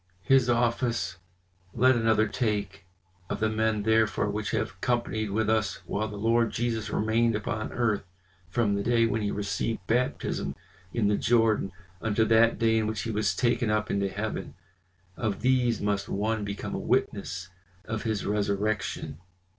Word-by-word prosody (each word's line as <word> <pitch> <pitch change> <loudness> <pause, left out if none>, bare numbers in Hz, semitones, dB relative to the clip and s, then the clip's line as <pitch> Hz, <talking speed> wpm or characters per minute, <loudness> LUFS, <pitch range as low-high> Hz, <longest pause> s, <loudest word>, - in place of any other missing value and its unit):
His 135 -2 +4
office 120 -5 +1 0.6
let 130 +3 +5
another 110 -1 +3
take.' 100 -3 -2 0.4
Of - - -2
the 110 0 +1
men 110 -1 +1
therefore 110 0 +2
which - - -3
have - - -2
companied 115 -3 0
with 110 +2 0
us 110 -3 +1
while 105 +2 -2
the 105 - -7
Lord 115 +2 +2
Jesus 115 -2 -2
remained 115 +2 +2
upon 110 +1 -3
earth, 115 -4 0 0.5
from 105 +1 +1
the 100 - 0
day 115 +1 +3
when 115 0 0
he 105 - 0
received 100 +2 -2
baptism 125 +3 -1 0.4
in 110 -4 +1
the 105 0 +2
Jordan, 115 -4 +2 0.3
unto 110 0 +2
that 115 +1 +4
day 110 -1 +3
in 110 - 0
which 110 -1 -2
he 115 - -2
was 105 0 0
taken 120 -2 +1
up 105 0 0
into 100 -1 0
heaven, 105 +3 -4 0.6
of 105 -3 -2
these 125 -3 +2
must 100 -1 -1
one 105 +2 -1
become 100 0 -4
a - - -2
witness 90 -1 -1 0.4
of 110 -1 -3
His 110 -3 -2
resurrection." 100 -5 -1
110 Hz, 160 wpm, -28 LUFS, 105-115 Hz, 0.6 s, let